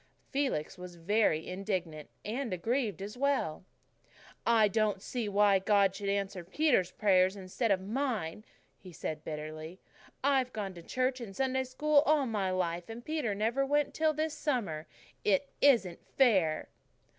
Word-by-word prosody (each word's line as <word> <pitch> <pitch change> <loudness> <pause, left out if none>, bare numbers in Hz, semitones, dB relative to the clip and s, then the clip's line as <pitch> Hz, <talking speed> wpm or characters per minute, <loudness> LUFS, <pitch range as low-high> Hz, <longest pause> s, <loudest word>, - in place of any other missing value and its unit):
Felix 265 - -1
was 180 -1 -8
very 170 -2 +1
indignant 180 -5 -4 0.2
and 240 +3 -3
aggrieved 210 +1 -1
as 210 +2 -7
well. 275 - 0 0.8
"I 225 -2 +5
don't 215 -1 +1
see 225 +2 -3
why 200 -1 +4
God 195 -1 +3
should 200 0 -4
answer 195 -2 -2
Peter's 195 - +2
prayers 190 -1 +3
instead 195 +5 -2
of 195 -2 +3
mine," 215 - -2 0.4
he 185 - -12
said 155 -1 -5
bitterly. 155 +3 -6 0.4
"I've 265 -2 +2
gone 200 -3 -4
to 170 - -10
church 255 +7 -1
and 200 -5 -8
Sunday 265 +1 0
School 295 +3 +3
all 300 -2 +4
my 210 -5 -1
life, 175 -1 -2
and 230 +2 -8
Peter 300 -10 -1
never 230 +6 +1
went 290 +1 +1
till 315 0 +2
this 310 0 -2
summer. 225 - -2 0.4
It 210 +7 +2
isn't 225 -11 +3
fair." 190 - +2
205 Hz, 150 wpm, -31 LUFS, 185-260 Hz, 0.8 s, I